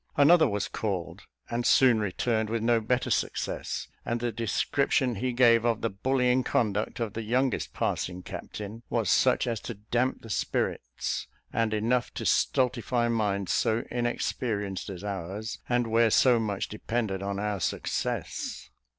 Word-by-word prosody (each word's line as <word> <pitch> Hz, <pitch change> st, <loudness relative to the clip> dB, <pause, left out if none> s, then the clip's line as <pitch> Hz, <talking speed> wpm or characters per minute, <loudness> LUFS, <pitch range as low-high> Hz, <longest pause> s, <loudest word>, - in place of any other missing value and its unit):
Another 160 Hz, +3 st, +6 dB
was 105 Hz, -1 st, -1 dB
called, 95 Hz, -6 st, -4 dB, 0.2 s
and 120 Hz, +1 st, -2 dB
soon 125 Hz, -2 st, +5 dB
returned 110 Hz, +2 st, 0 dB
with 115 Hz, 0 st, -1 dB
no 115 Hz, -1 st, +3 dB
better 125 Hz, +3 st, 0 dB
success; -, -, -2 dB, 0.2 s
and 120 Hz, 0 st, -1 dB
the 120 Hz, 0 st, -1 dB
description 120 Hz, +3 st, +1 dB
he 125 Hz, +4 st, -1 dB
gave 120 Hz, -2 st, +5 dB
of 115 Hz, -2 st, +1 dB
the 115 Hz, -, -1 dB
bullying 125 Hz, +4 st, +2 dB
conduct 110 Hz, -6 st, 0 dB
of 115 Hz, -3 st, -2 dB
the 115 Hz, -, -3 dB
youngest 125 Hz, +3 st, 0 dB
passing 90 Hz, 0 st, -2 dB
captain 105 Hz, +4 st, -7 dB
was 115 Hz, -5 st, +1 dB
such 130 Hz, 0 st, +4 dB
as 115 Hz, -3 st, -1 dB
to 120 Hz, -, -6 dB
damp 120 Hz, +5 st, -1 dB
the 115 Hz, -, -10 dB
spirits, 60 Hz, -10 st, -2 dB, 0.3 s
and 115 Hz, -1 st, +1 dB
enough 115 Hz, +3 st, +1 dB
to -, -, -4 dB
stultify 120 Hz, -1 st, +2 dB
minds 100 Hz, -4 st, 0 dB
so 115 Hz, +1 st, +1 dB
inexperienced 115 Hz, -5 st, -2 dB
as 95 Hz, -1 st, -7 dB
ours, 100 Hz, +2 st, -4 dB
and 120 Hz, 0 st, +2 dB
where 115 Hz, 0 st, +3 dB
so 120 Hz, +2 st, +5 dB
much 105 Hz, -3 st, -2 dB
depended 105 Hz, -2 st, -2 dB
on 100 Hz, 0 st, -3 dB
our 105 Hz, -1 st, -2 dB
success. 85 Hz, -, -3 dB
115 Hz, 150 wpm, -28 LUFS, 105-120 Hz, 0.3 s, Another